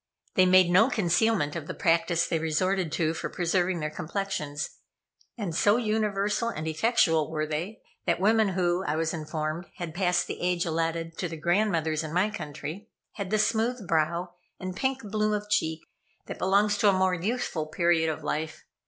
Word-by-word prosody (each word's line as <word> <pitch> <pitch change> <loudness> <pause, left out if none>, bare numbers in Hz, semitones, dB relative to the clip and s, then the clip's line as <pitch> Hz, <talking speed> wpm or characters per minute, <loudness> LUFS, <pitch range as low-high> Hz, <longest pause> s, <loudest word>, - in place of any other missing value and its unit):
They 185 -1 +5
made 185 -1 +6
no 210 +8 +5
concealment 180 - +1
of 160 -3 -5
the - - -5
practice 170 0 +2
they 165 - -1
resorted 170 +2 0
to 160 -1 +1
for - - -4
preserving 175 0 0
their 150 0 -2
complexions, 155 -4 -3 0.7
and 200 -7 -3
so 205 +6 +4
universal 215 -1 0
and 160 -8 -5
effectual 160 -3 +2
were 155 -1 -1
they, 165 +8 -4 0.2
that 170 - +2
women 215 +2 +4
who, 175 0 +1
I 155 - -1
was 160 0 -1
informed, 155 +1 -4
had 175 -4 -6
passed 180 -1 +1
the - - -6
age 180 -1 +1
allotted 165 0 -2
to 180 - -2
the 165 - -6
grandmothers 165 -3 +1
in 155 0 -6
my 190 +5 +2
country, 155 +3 -7 0.2
had 200 -3 -5
the 215 - +2
smooth 225 0 0
brow 170 +2 0 0.3
and 185 -1 -5
pink 265 +4 -1
bloom 215 0 0
of 210 0 -3
cheek 160 -5 +1 0.4
that - - -7
belongs 205 +2 +2
to 210 - +5
a - - +4
more 185 0 +2
youthful 180 -4 -2
period 160 0 +2
of 155 - -4
life. 160 +1 -3
175 Hz, 180 wpm, -27 LUFS, 160-205 Hz, 0.7 s, made